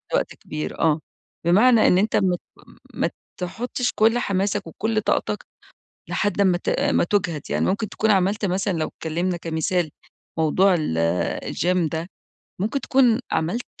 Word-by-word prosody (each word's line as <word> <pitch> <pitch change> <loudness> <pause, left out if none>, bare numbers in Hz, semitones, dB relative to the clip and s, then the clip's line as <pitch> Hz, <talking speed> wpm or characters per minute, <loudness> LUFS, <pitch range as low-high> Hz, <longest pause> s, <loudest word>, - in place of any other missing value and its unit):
وقت - - -1
كبير 155 0 -6
آه. 160 -1 +3 0.5
بمعنى 215 +6 +5
إن 180 - +5
أنت 210 +4 +1
ما 185 -2 +3
ت - - -12 0.5
ما - - 0 0.3
تحطش 240 +7 -2
كل 225 +2 +4
حماسك 200 -2 -1
وكل 215 +6 -1
طاقتك - - -1 0.6
لحد 205 -1 0
أما 185 -3 +4
ت - - -2
ما - - +2
تُجهَد 170 -5 0
يعني - - +1
ممكن 210 +3 0
تكون 220 +3 0
عملت 200 +2 +2
مثلًا 195 +1 0
لو 155 - -1
اتكلمنا 175 +3 -2
كمثال 165 0 -1 0.5
موضوع 180 +5 +4
ال 80 - -2 0.6
الgym 175 0 +1
ده 165 +2 -3 0.5
ممكن 220 +8 -1
تكون 255 -4 +3
عملت 195 +10 -1
190 Hz, 150 wpm, -23 LUFS, 170-215 Hz, 0.6 s, بمعنى